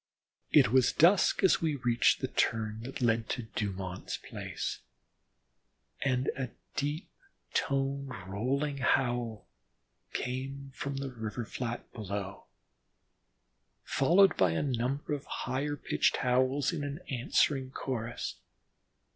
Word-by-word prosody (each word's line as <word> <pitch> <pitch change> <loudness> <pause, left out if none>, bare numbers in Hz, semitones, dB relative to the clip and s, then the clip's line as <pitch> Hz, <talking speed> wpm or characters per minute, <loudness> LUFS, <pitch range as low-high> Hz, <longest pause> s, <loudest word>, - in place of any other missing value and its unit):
It - - +7
was 130 -1 +5
dusk 180 +5 +5
as 190 - +5
we 160 -3 +1
reached 120 -3 +3
the - - 0
turn 110 -1 0
that 130 +4 -7
led 115 -1 +2
to 125 - -2
Dumont's 95 -4 -4
place, - - -5 1.2
and 130 -1 +1
a 130 -2 -3 0.3
deep 145 +4 -2 0.5
toned 135 0 0 0.2
rolling 135 +8 -1
howl 120 -4 +1 0.7
came 135 +2 -4
from 140 +1 -4
the 135 -1 -3
river 110 0 -4
flat 120 +1 -5
below, 100 -2 -5 1.4
followed 180 +8 +5
by 90 -3 +4
a 80 - 0
number 135 +2 -1
of 145 0 -3
higher 140 +3 -2
pitched - - +1
howls 130 +4 +2
in 145 -3 -3
answering 130 +1 +2
chorus. 120 -3 -4
130 Hz, 115 wpm, -31 LUFS, 115-140 Hz, 1.4 s, It